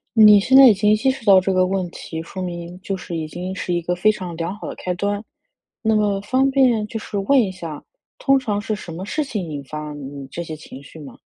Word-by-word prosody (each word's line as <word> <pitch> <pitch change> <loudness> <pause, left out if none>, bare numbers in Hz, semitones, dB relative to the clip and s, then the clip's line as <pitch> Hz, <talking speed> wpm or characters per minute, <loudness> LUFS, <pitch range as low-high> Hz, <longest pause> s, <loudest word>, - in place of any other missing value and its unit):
你 210 -2 +8
现 260 +7 +3
在 270 -1 +10
已 215 - +6
经 210 +2 +2
意 - - +4
识 265 +1 -1
到 195 -3 +7
这 190 +1 -1
个 185 0 +3
问 185 -1 -1
题， 160 -1 -7
说 185 +3 -7
明 175 0 -6
就 195 - -3
是 175 -2 -6
已 160 -1 -3
经 180 +4 -6
是 185 -1 -3
一 175 - +1
个 175 +1 -2
非 215 +5 +3
常 180 -5 -7
良 170 +3 -3
好 - - -7
的 - - -6
开 180 - -3
端。 205 +3 -2 0.6
那 220 -1 +2
么 205 -2 +1
方 260 +6 +1
便 250 -6 +3
就 225 - -5
是 215 - -7
问 260 +8 +3
一 210 -5 0
下， 165 -5 -8 0.4
通 275 -1 +3
常 210 -6 -2
是 215 0 -3
什 175 -5 -9
么 180 +3 -6
事 305 +7 -1
情 205 - -4
引 145 -2 -6
发 150 +2 -6
你 140 -1 -8
这 170 - -5
些 160 - -6
情 140 -2 -12
绪 145 - -14
吗？ 145 - -12
190 Hz, 275 characters per minute, -21 LUFS, 170-215 Hz, 0.6 s, 在